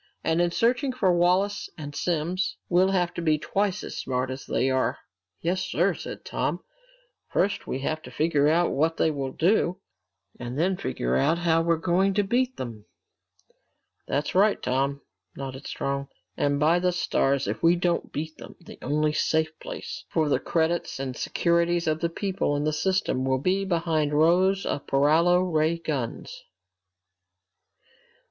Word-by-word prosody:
And 165 +1 +2
in 175 - +2
searching 245 - +1
for 195 -8 +2
Wallace 185 +4 +1
and 145 -2 -7
Simms, 175 +2 -1
we'll 185 +2 +4
have 180 -2 +1
to 170 - -4
be 155 -2 +2
twice 195 +4 -1
as - - -7
smart 130 0 -2
as 130 +1 -7
they 125 +3 +1
are!" 130 -1 +1 0.4
"Yes, 180 +3 0
sir," 185 0 +1
said - - -8
Tom. - - -2 0.7
"First 200 - 0
we - - -2
have 155 +3 -2
to - - -11
figure 150 -2 +2
out 170 +3 +3
what 160 +3 +1
they 160 - +2
will 135 -3 -3
do, 180 +3 +1 0.6
and 120 +2 -5
then 185 +5 +2
figure 60 - -2
out 160 - +2
how 165 -1 +2
we're 170 0 +2
going 185 +4 +1
to 205 - +3
beat 250 +5 0
them!" 115 -4 -7 1.2
"That's 145 +1 -1
right, 205 +3 +4
Tom," 135 +2 -1 0.3
nodded 135 0 -7
Strong. 140 0 -3 0.3
"And 145 0 +1
by 160 +4 +4
the 180 0 +1
stars, 140 -6 +1
if - - -3
we 170 +1 +5
don't 175 0 -1
beat 155 +1 -4
them, - - -11
the 170 - -13
only 150 +2 0
safe 160 0 +1
place - - -7
left - - -30
for 155 -3 +2
the - - +2
credits 165 -3 -1
and 130 -2 -4
securities 170 +3 +1
of 155 0 0
the 170 - 0
people 190 -4 -1
in 145 - -1
the 155 0 0
system 185 -5 0
will 130 0 +1
be 185 +8 0
behind 165 -4 0
rows 185 +5 +3
of - - -3
paralo 160 +6 +4
ray 165 -2 +1
guns!" 145 -8 -4
165 Hz, 165 wpm, -26 LUFS, 145-180 Hz, 1.2 s, we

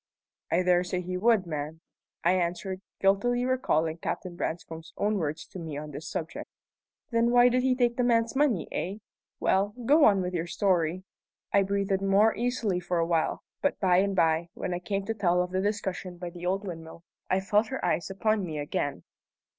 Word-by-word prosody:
"I 180 +2 +2
dare 180 0 +3
say 180 0 -2
he 180 +1 -4
would, 215 0 +3
ma'am," 155 -1 -5 0.4
I 170 - +4
answered, 185 +1 -1 0.2
guiltily 245 +6 +2
recalling 165 -11 +1
Captain 180 +1 -4
Branscome's 160 -1 -5
own 210 0 +1
words 155 -1 -3
to 190 - -8
me 160 -4 -5
on 150 0 -6
this 150 +4 -7
subject. 165 -3 -5 0.6
"Then 230 0 +3
why 245 0 +6
did 250 +1 +2
he 255 0 +2
take 240 -2 +1
the 250 - +2
man's 230 0 +2
money, 265 - +2
eh? 190 +4 -3 0.4
Well, 200 +2 +1
go 295 +4 +6
on 200 -3 +5
with 180 0 -3
your 170 -1 -2
story." 180 -2 +1 0.5
I 200 - +6
breathed 195 0 0
more 200 +3 +4
easily 230 -6 0
for 180 0 -2
a 165 - +2
while, 165 -2 0 0.2
but 285 - 0
by 185 -3 +4
and 195 +1 +2
by, 165 -1 +2
when 180 - -3
I 175 - -2
came 195 +2 -3
to 225 - -1
tell 180 -5 +2
of 180 - -6
the 185 0 0
discussion 190 -3 -3
by 175 0 -6
the 175 0 -6
old 195 +3 0
windmill, 165 -2 -8 0.3
I 185 - +3
felt 210 +3 +2
her 265 +3 -4
eyes 170 0 0
upon 215 +2 0
me 160 -4 -4
again. 145 -7 -2
185 Hz, 195 wpm, -28 LUFS, 170-215 Hz, 0.6 s, why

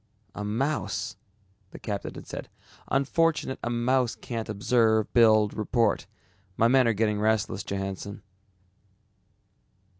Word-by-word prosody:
"A 105 - -5
mouse!" 130 +9 -2 0.5
the - - -11
captain 100 -2 -5
had - - -9
said, - - -7 0.4
"unfortunate 140 +1 +1
a 120 - -2
mouse 120 +1 +1
can't 115 -2 -5
observe, 110 0 +2
build, 110 -3 +5
report. 110 0 0 0.5
My 115 - +5
men 130 0 +4
are 115 - +3
getting 105 0 0
restless, 110 0 +1
Johannsen." 100 +1 -5
110 Hz, 115 wpm, -27 LUFS, 105-125 Hz, 0.5 s, build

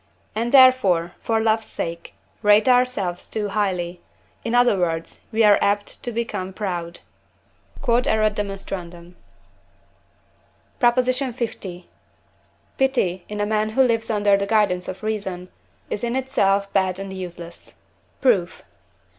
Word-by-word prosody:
and 230 +2 -2
therefore, 255 -11 +5
for 225 -1 0
love's 220 0 +1
sake, 170 0 -6 0.3
rate 210 +2 +5
ourselves 245 -8 +1
too 210 -2 -3
highly; 180 -4 -2 0.4
in 230 +1 -1
other 245 -3 +5
words, 165 -2 -3
we 225 0 +2
are 210 -1 +6
apt 205 0 -1
to 240 - -4
become 210 -5 -3
proud. 175 -4 -3 0.8
Q.E.D. 240 +1 +2 2.7
PROP. 240 -1 +4
L. 255 +1 +1 1.5
Pity, 240 -10 +1
in 210 0 -5
a 205 - +1
man 215 0 0
who 265 +5 +3
lives 230 -3 0
under 205 -2 +3
the 200 0 -1
guidance 200 -4 +1
of 185 +2 -7
reason, 190 -4 -4 0.4
is 210 - -3
in 240 +1 -1
itself 200 -7 +1
bad 190 -2 +1
and 195 0 -6
useless. 175 -2 -9 0.5
Proof. 200 -10 +1
210 Hz, 120 wpm, -22 LUFS, 185-235 Hz, 2.7 s, are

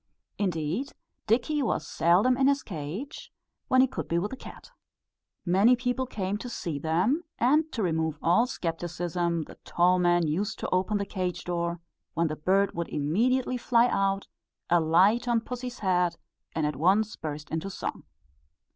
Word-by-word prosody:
Indeed, 180 - -1 0.3
Dickie 255 +7 +2
was 260 - -1
seldom 185 +10 +3
in 265 +1 +3
his 280 0 +2
cage, 180 - -6 0.4
when 255 -1 +5
he 265 - +5
could - - -5
be 170 - 0
with 190 +5 -1
the - - -4
cat. 380 - -12 0.7
Many 195 +8 +5
people 250 +1 -1
came 200 -3 -3
to 245 - -6
see 170 -10 -4
them; 180 - +1
and 300 +6 +3
to 225 - -2
remove 160 -3 0
all 180 +11 +3
scepticism 175 -2 -2
the - - -14
toll 180 +1 +3
man 175 -1 +3
used 190 +8 -1
to - - -4
open 190 +3 +1
the 200 - -2
cage 185 -3 -3
door, 170 -1 -2 0.3
when 165 0 +1
the 155 - -3
bird 195 +6 +2
would 170 0 -3
immediately 240 - +1
fly 240 0 +3
out, 195 -1 0 0.4
alight 180 +8 +4
on 235 -1 +3
pussy's 250 +1 -6
head, 180 -3 +1 0.4
and 160 -1 0
at 150 -2 -2
once 200 +8 +2
burst 150 -1 -6
into 160 +4 -2
song. - - -5
190 Hz, 165 wpm, -27 LUFS, 170-240 Hz, 0.7 s, when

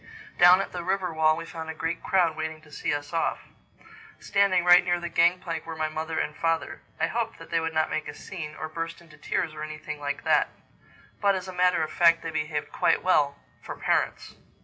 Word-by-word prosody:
Down 180 +2 +8
at - - -5
the 175 -1 -5
river 185 -1 -1
wall 155 0 +3
we 165 - -6
found 160 -1 -7
a 160 - -5
great 165 +2 -3
crowd 180 -5 +2
waiting 155 0 -4
to 150 -1 -19
see - - -2
us 145 +2 -4
off. 165 - 0 0.8
Standing 195 -3 +2
right 180 0 +8
near 175 0 +1
the 175 0 -5
gang 170 +1 +4
plank 165 -3 -4
were 165 - -5
my 155 0 -1
mother 160 +1 -4
and 150 - -2
father. 165 0 -1 0.2
I 165 - +3
hoped 225 +5 -2
that 165 - -13
they 165 - +2
would 160 0 -3
not 155 0 +1
make 155 - -2
a - - -7
scene, 155 -5 -7
or 160 - -5
burst 165 +1 -5
into 170 -2 -17
tears 160 -3 -2
or - - -8
anything 155 -1 -6
like 145 -1 -4
that. - - +3 0.7
But 200 -1 +3
as 185 0 -4
a 185 - -7
matter 180 -2 +3
of 155 - -4
fact 165 -1 +4
they 165 - -4
behaved 155 -1 -3
quite - - +2
well—for - - -1
parents. - - -1
165 Hz, 220 wpm, -26 LUFS, 155-175 Hz, 0.8 s, Down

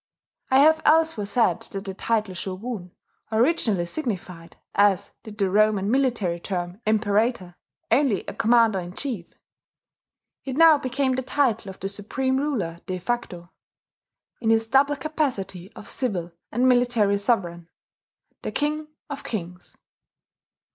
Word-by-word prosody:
I 260 - +4
have 315 +2 +5
elsewhere 315 -9 +3
said 230 +3 +2
that 195 0 -6
the 195 - -4
title 215 -1 -1
"shogun" 190 +2 -5 0.4
originally 220 - +2
signified, 180 - -5 0.2
as 200 -2 +3
did 215 -1 -11
the 195 -3 +1
Roman 210 0 +3
military 235 -10 +1
term 175 +2 -4
Imperator, 215 -3 +1 0.4
only 245 -4 +2
a - - -6
commander 230 -3 +3
in 175 0 -7
chief: 225 -8 -4 1.2
it 265 -1 -5
now 325 -2 +7
became 260 +1 0
the 260 - -1
title 255 -6 0
of 190 - -10
the 195 - -3
supreme 260 +7 -2
ruler 230 - -2
de 185 - -2
facto, 180 -4 -4 0.9
in 225 - -1
his 225 0 +3
double 275 +4 +3
capacity 260 - -3
of - - -11
civil 185 -9 -2 0.2
and 245 +3 +2
military 240 -5 +3
sovereign, 175 -6 -1 0.7
the - - -4
King 300 +1 -1 0.2
of 285 0 -7
kings. 180 -4 -6
220 Hz, 135 wpm, -24 LUFS, 190-260 Hz, 1.2 s, now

